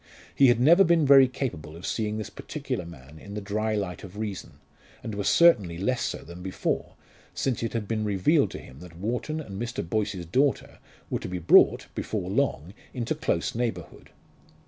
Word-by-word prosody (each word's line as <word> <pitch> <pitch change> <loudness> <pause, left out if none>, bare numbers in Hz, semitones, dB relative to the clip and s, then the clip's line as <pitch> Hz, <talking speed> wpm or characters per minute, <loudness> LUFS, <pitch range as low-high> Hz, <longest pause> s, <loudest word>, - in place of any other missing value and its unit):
He 135 - +5
had 120 -1 +4
never 170 +9 +6
been 170 -3 +3
very 135 -1 +8
capable 110 - -5
of 85 - -9
seeing 110 -1 -2
this 110 - -5
particular 90 - -5
man 75 -1 -13
in 100 +4 -10
the - - -2
dry 110 +2 -2
light 95 -4 -4
of 100 0 -10
reason, 105 -3 -5 0.5
and 110 - -5
was 100 -1 0
certainly 105 - +4
less 125 +7 -1
so - - -3
than 85 +3 -11
before, 95 0 -3 0.4
since 130 -3 -1
it 115 - -3
had 115 -3 -3
been 110 0 -1
revealed 105 - +2
to - - -7
him 65 - -13
that 85 -1 -12
Wharton 125 - -3
and 100 -9 -7
Mr. 120 -7 -4
Boyce's 100 -2 -2
daughter 135 - 0 0.3
were - - 0
to - - -6
be 90 - -3
brought, 85 -1 +5
before 95 -4 -3
long, 100 - -1 0.2
into 120 +3 -1
close 150 - -1
neighbourhood. 115 -8 -4
105 Hz, 190 wpm, -26 LUFS, 90-125 Hz, 0.5 s, very